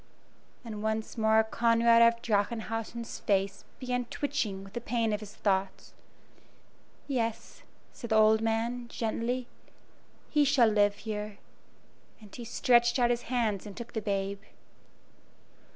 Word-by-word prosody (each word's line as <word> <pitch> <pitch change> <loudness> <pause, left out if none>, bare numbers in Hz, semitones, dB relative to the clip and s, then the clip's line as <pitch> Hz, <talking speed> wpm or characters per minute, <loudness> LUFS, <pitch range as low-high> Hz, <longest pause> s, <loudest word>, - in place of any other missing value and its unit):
And 215 -2 -6
once 220 0 -2
more 220 -1 +4
Conrad 230 +1 +3
of 235 0 +4
Drachenhausen's 225 +2 -2
face 195 -1 0
began 250 -1 -2
twitching 225 -7 -3
with 195 +1 -13
the 240 - -4
pain 230 -2 0
of 210 - -1
his 210 0 -11
thoughts. 195 -2 -1 1.1
"Yes," 230 -5 -3 0.3
said 235 - -8
the 220 - +2
old 220 0 +5
man, 230 +2 -1
gently, 235 +2 -2 0.8
"he 300 -1 +4
shall 270 -5 +4
live 205 -1 +3
here," 210 -1 -5 0.8
and 210 -3 -14
he 240 - -7
stretched 240 +1 +3
out 240 -1 +3
his 240 -1 -3
hands 220 -5 0
and 200 - -10
took 235 0 -8
the 220 - -2
babe. 200 -1 -2
225 Hz, 135 wpm, -29 LUFS, 210-235 Hz, 1.1 s, old